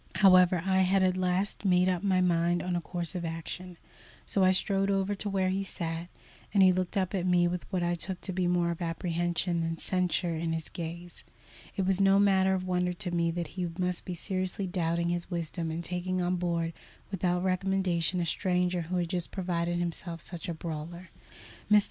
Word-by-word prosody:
However, 185 -2 +6
I 190 0 +3
had 190 +1 +3
at 185 -1 +3
last 185 +3 -1
made 180 -2 +4
up 180 -2 +1
my 190 -2 +2
mind 175 -1 +2
on 180 -1 -1
a 175 - 0
course 175 0 -4
of 180 -2 -3
action, 170 +2 -6 0.5
so 195 - +1
I 185 - +6
strode 195 +1 +1
over 195 0 +1
to 205 +1 -4
where 190 -1 +1
he 190 +1 0
sat, 170 -3 -4 0.4
and 200 -2 +5
he 185 - +7
looked 185 +1 -1
up 185 0 0
at 185 -2 0
me 175 -1 +4
with 180 +2 -4
what 180 -2 0
I 175 0 +1
took 180 +1 -4
to 190 - -4
be 180 0 0
more 175 -1 +2
of 170 - -6
apprehension 170 +1 -1
than 165 0 -2
censure 180 -1 +1
in 165 0 -2
his 160 -1 -4
gaze. 170 +1 -7 0.5
It 195 - 0
was 190 +1 +2
no 195 0 +5
matter 190 -1 +4
of 185 -1 -3
wonder 180 -1 0
to 175 0 -4
me 170 -1 +1
that 170 -1 -3
he 180 -2 -3
must 180 -1 0
be 180 - -5
seriously 185 +2 -2
doubting 170 -1 0
his 175 0 -2
wisdom 170 -1 -3
in 165 +2 -3
taking 180 +1 -2
on 180 0 +1
board 170 -1 -1 0.4
without 180 -2 0
recommendation 185 -2 +1
a 175 - 0
stranger 180 +1 0
who 170 +3 -4
had 175 -2 0
just 175 -1 -2
proved 175 -3 -2
himself 175 0 -3
such 175 +1 -7
a - - -1
brawler. 170 +3 -6 0.6
"Mr. 210 0 +8
180 Hz, 205 wpm, -29 LUFS, 170-185 Hz, 0.6 s, Mr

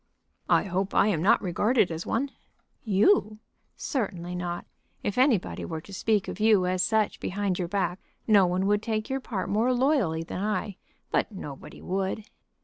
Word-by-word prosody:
"I - - +4
hope 190 0 -2
I 210 - +5
am 165 -7 0
not 195 +6 +4
regarded 200 +3 +2
as 165 +1 -5
one." 270 +4 -1 0.5
"You? 215 - +3 0.4
certainly 180 - -3
not. 175 -1 -4 0.4
If 205 - -1
anybody 250 -7 +2
were 160 -2 -4
to 195 - -13
speak 210 +1 +1
of - - -6
you 210 -4 +4
as 180 0 0
such 220 +1 +1
behind 195 -1 -2
your 175 - -1
back 185 -1 -1 0.3
no 200 -4 +5
one 180 +2 0
would 205 +1 +2
take 215 +1 -2
your 270 - 0
part 215 -7 -4
more 225 +5 +2
loyally 245 - +2
than 180 +2 -5
I. 205 -2 -2 0.3
But - - +1
nobody 150 -9 -9
would." 195 +3 -2
200 Hz, 170 wpm, -27 LUFS, 180-220 Hz, 0.5 s, I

